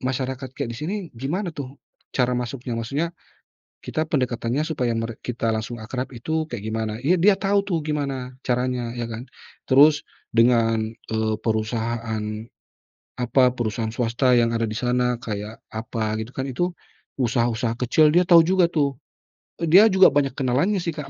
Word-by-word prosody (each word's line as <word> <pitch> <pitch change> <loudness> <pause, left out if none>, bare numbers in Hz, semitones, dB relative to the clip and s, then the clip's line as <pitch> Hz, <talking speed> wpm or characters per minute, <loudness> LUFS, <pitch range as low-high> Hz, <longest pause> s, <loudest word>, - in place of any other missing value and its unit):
masyarakat 130 +1 -3
kayak 120 - -3
di - - -8
sini 155 - -3 0.2
gimana 160 - -3
tuh 140 -2 -7 0.4
cara 125 -1 +2
masuknya?" 125 0 -3
Maksudnya 140 +9 -2 0.7
kita 155 0 -2
pendekatannya 125 0 0
supaya 130 -7 -1
merek 115 0 -4
kita 115 -2 -1
langsung 110 +2 -4
akrab 125 +4 -5
itu 160 +6 -2
kayak 110 -4 -6
gimana? 110 -1 -2
Ya 170 - +4
dia 195 +1 +5
tahu 200 0 +2
tuh 200 -4 -1
gimana 140 -4 -3
caranya, 125 -1 -1
ya 120 - -2
kan. 115 +3 -7 0.4
Terus 145 +3 +6 0.3
dengan, 115 -1 +3
eee, 110 -1 -2
perusahaan, 110 0 -2 1.0
apa, 125 +1 +3
perusahaan 115 -2 -2
swasta 120 +2 +1
yang 115 -1 +3
ada 115 - 0
di 110 0 -2
sana 125 -1 +1
kayak 105 -1 -6 0.2
apa 110 -1 -2
gitu 115 - -12
kan, 130 0 -4
itu 175 +8 -1 0.5
usaha-usaha 120 -1 0
kecil 150 +5 +4
dia 180 - +6
tahu 170 -2 +6
juga 180 -2 +3
tuh. 140 -4 +1 0.6
E 170 - -2
dia 190 +7 +7
juga 190 -1 +6
banyak 140 -2 +1
kenalannya 140 +10 +1
sih 170 -2 -2
Kak, 150 -2 -7
125 Hz, 160 wpm, -23 LUFS, 115-150 Hz, 1.0 s, dia